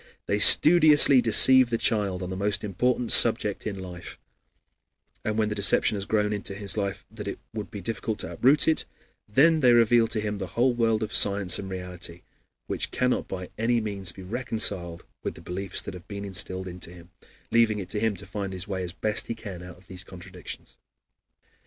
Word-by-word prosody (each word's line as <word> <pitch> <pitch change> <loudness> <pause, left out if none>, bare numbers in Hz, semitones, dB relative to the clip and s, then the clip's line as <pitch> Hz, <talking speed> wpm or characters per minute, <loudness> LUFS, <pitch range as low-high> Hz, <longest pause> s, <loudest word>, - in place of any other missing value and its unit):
They 105 - -1
studiously 150 - +7
deceive 130 +3 +5
the 115 - -1
child 100 -5 -1
on 90 - -6
the - - -4
most 100 +2 -2
important 120 +4 -1
subject 110 -3 +3
in 100 -2 -5
life, 90 -2 -10 1.1
and 110 0 -3
when 110 -1 0
the - - -3
deception 105 +1 +3
has 100 -1 -4
so - - -22
grown 105 -1 0
into 100 -1 -5
his 100 -1 -1
life 100 -2 -4
that 110 -2 -9
it 100 - -5 0.2
would 105 -2 -6
be 100 -3 -8
difficult 110 +2 -4
to - - -6
uproot 140 +4 +4
it, 160 - +1 0.4
then 155 +8 +3
they 125 -4 +4
reveal 115 0 +4
to 110 -1 -1
him 105 -1 -4
the 95 - -5
whole 125 +1 +2
world 115 -2 0
of 105 -2 -6
science 100 -2 +2
and 95 - -7
reality, 90 -2 -7 0.4
which - - -3
cannot 125 0 -1
by 90 -1 -7
any 120 +1 +1
means 100 -4 -2
be 95 - -12
reconciled 90 -5 -2 0.2
with - - -5
the - - -12
beliefs 95 +1 -2
that - - -8
have 90 -2 -12
been 100 -1 -7
instilled 95 -1 -1
into 90 -1 -6
him, 85 0 -15 0.4
leaving 115 -2 +2
it 95 -3 -7
to 105 - -3
him 110 -1 -1
to 100 +2 -6
find 100 -2 -6
his 95 +2 -3
way 95 -2 -4
as 90 0 -4
best 105 +5 0
he 115 - -4
can 100 -6 -9
out 90 0 -12
of 90 - -22
these 95 0 -8
contradictions. 90 -1 -11
105 Hz, 205 wpm, -25 LUFS, 95-115 Hz, 1.1 s, studiously